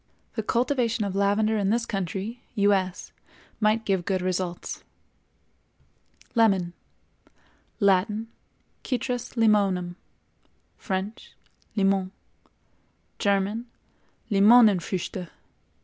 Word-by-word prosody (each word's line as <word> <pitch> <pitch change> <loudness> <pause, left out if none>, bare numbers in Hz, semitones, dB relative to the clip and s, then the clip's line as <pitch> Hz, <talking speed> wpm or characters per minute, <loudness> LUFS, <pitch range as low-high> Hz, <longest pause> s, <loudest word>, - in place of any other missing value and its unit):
The 220 - -2
cultivation 235 -1 0
of 195 -1 -3
lavender 210 +2 +2
in 195 -1 +1
this 230 +2 +1
country 195 +4 -4
(U. 205 -1 +4
S.) 185 -1 -2 0.5
might 215 +1 +2
give 190 -3 +1
good 185 0 -1
results. 180 -1 -3 1.5
LEMON. 195 -7 +3 1.1
Latin—Citrus 225 +5 -2
Limonum; 200 -6 +2 0.8
French—Limon; 195 -1 -3 1.1
German—Limonenfrüchte. 200 -2 +1
200 Hz, 70 wpm, -26 LUFS, 190-225 Hz, 1.5 s, U